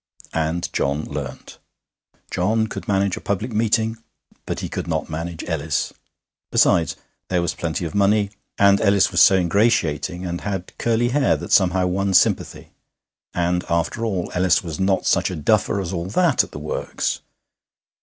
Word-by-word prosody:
And 80 +2 -1
John 70 +2 0
learnt. - - -7 0.7
John 110 +5 +1
could 110 - -7
manage 100 -2 +1
a - - -7
public 105 +4 -2
meeting, 110 +1 +1 0.5
but - - -3
he - - -3
could - - -5
not 80 -1 -2
manage 80 +1 -5
Ellis. 75 -4 -2 0.6
Besides, 80 - +3 0.3
there 90 - +1
was 85 - -1
plenty 85 +1 -3
of 80 - -5
money; 100 0 +2 0.3
and 100 0 +5
Ellis 100 -1 +3
was 90 -1 +3
so 95 - +7
ingratiating, 90 -2 +1
and 85 -1 -4
had 95 -3 -5
curly 120 +1 +1
hair 135 +2 +2
that - - -8
somehow 95 -1 +4
won 95 +1 0
sympathy. - - +1 0.6
And, 90 0 0
after 85 +7 -1
all, 95 -6 -2
Ellis 90 +1 +2
was 80 -4 -6
not 95 0 +1
such - - +2
a 90 - -4
duffer 100 +6 +1
as 95 -1 -4
all 85 0 -3
that 165 - +3
at - - -10
the - - -9
works. 75 +1 -3
95 Hz, 165 wpm, -22 LUFS, 85-105 Hz, 0.7 s, so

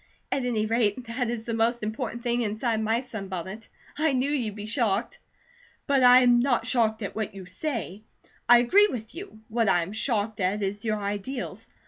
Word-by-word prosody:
At 265 -2 0
any 225 -3 0
rate, 225 +1 0
that 240 +1 -2
is 235 -2 -3
the 230 - -4
most 230 +1 +1
important 235 +2 -4
thing 240 0 0
inside 220 +1 -1
my 225 +2 +1
sunbonnet. 195 -3 -7 0.3
I 310 -2 +2
knew 260 +2 0
you'd 235 -8 -1
be 210 -1 -7
shocked." 215 -3 -1 0.7
"But 280 -2 +2
I 250 0 +8
am 245 -1 +5
not 245 -2 +1
shocked 225 -3 +1
at 200 - -5
what 215 -2 -3
you 190 -1 -8
say, 210 - -4 0.5
I 240 - +9
agree 385 +13 +5
with 225 - -6
you. 335 - -10
What 230 -2 +1
I 175 -2 +3
am 175 - -7
shocked 220 -2 -1
at 200 +2 0
is 200 +1 -3
your 215 -2 0
ideals. 205 +6 -5
225 Hz, 190 wpm, -26 LUFS, 210-245 Hz, 0.7 s, I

